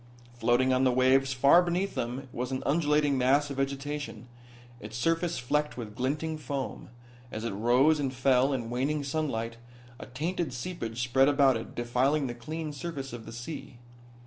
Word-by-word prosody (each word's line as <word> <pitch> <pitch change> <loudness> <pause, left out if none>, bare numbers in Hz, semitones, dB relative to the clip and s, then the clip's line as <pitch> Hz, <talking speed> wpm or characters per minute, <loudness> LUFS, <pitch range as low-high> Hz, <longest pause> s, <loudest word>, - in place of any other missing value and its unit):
Floating 120 +2 +2
on 130 +1 +2
the 130 - +4
waves 130 +2 +3
far 140 +6 +6
beneath 180 +3 -1
them 125 +3 -4
was 125 +2 -3
an 130 - -2
undulating 150 -2 +2
mass 140 +3 +3
of 140 - -6
vegetation, 135 -3 -3 0.5
its 110 +1 -7
surface 165 +5 0
flecked 150 +4 -1
with 110 -4 -6
glinting 150 +5 -2
foam. 140 -1 -5 0.4
As 110 +1 -5
it 115 - -1
rose 125 +9 +3
and 135 -2 -1
fell 130 +1 +3
in 120 -4 -3
waning 140 +4 0
sunlight 135 -6 -2 0.4
a - - -8
tainted 155 +3 -3
seepage 125 -4 -4
spread 130 +2 +4
about 140 -3 +4
it, 115 - -6
defiling 130 +5 +1
the 120 - -3
clean 155 +6 -5
surface 140 -3 -6
of 115 -2 -8
the - - -7
sea. 120 +2 -7
135 Hz, 170 wpm, -29 LUFS, 120-150 Hz, 0.5 s, far